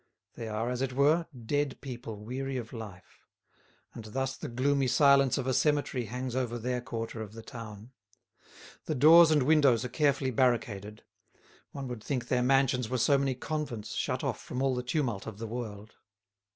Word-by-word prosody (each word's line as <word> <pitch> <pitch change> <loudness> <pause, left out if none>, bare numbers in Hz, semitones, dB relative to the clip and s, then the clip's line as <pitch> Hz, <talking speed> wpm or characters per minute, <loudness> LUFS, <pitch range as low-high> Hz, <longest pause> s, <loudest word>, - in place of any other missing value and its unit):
They 115 - -7
are, 110 +3 -2
as 125 0 -3
it 135 -1 -1
were, 150 +5 +3 0.2
dead 145 +2 -1
people 120 -4 -7
weary 130 +3 -4
of 115 -1 -6
life. 105 -6 -10 0.7
And 115 - -8
thus 135 +4 -3
the - - -7
gloomy 135 +3 +1
silence 140 0 +4
of - - -2
a 130 - 0
cemetery 140 -2 +1
hangs 125 +2 -4
over 120 -2 -1
their 125 +1 -2
quarter 115 -1 -5
of 105 -1 -8
the 115 0 -10
town. 110 0 -9 0.9
The 155 - -2
doors 160 +5 +8
and 150 -4 +3
windows 135 -5 +4
are - - -4
carefully 140 -1 +1
barricaded; 110 -4 0 0.7
one 140 -2 -6
would 120 -4 -7
think 130 -4 -3
their 125 -1 +2
mansions 125 -2 +2
were 130 - -1
so 140 +3 +3
many 135 -2 0
convents 140 -5 -4
shut - - -2
off - - -2
from 125 - -6
all 135 -1 +2
the 125 - -1
tumult 125 -6 -2
of 110 -3 -7
the 115 - -5
world. 110 -2 -6
125 Hz, 180 wpm, -30 LUFS, 115-135 Hz, 0.9 s, doors